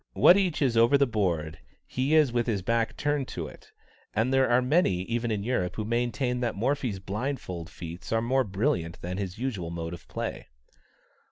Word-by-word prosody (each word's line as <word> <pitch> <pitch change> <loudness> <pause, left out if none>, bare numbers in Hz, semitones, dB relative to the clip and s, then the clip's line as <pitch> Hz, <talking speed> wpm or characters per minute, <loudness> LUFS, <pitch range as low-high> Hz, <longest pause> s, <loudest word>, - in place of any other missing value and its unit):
What 175 - +7
each 185 -7 +1
is 125 -4 +2
over 115 +5 +5
the 140 - +4
board, 90 - -1 0.3
he 135 +5 0
is 150 -6 +4
with 120 0 +1
his 100 -5 -1
back 115 +2 0
turned 145 -2 0
to - - -5
it, - - -13 0.4
and 115 +5 +1
there 135 -1 +4
are 120 +1 +5
many 125 - +2
even 120 +3 -2
in 105 -2 -1
Europe 105 -7 -1
who 110 - -3
maintain 120 +2 0
that 120 -2 -1
Morphy's 125 -1 0
blindfold 95 -4 -4
feats 85 +1 -8
are 115 - +3
more 130 +4 +2
brilliant 95 - -1
than 90 +2 -3
his 95 -2 -4
usual 110 -9 -3
mode 85 0 -4
of 85 - -10
play. - - -5
115 Hz, 190 wpm, -28 LUFS, 95-130 Hz, 0.4 s, What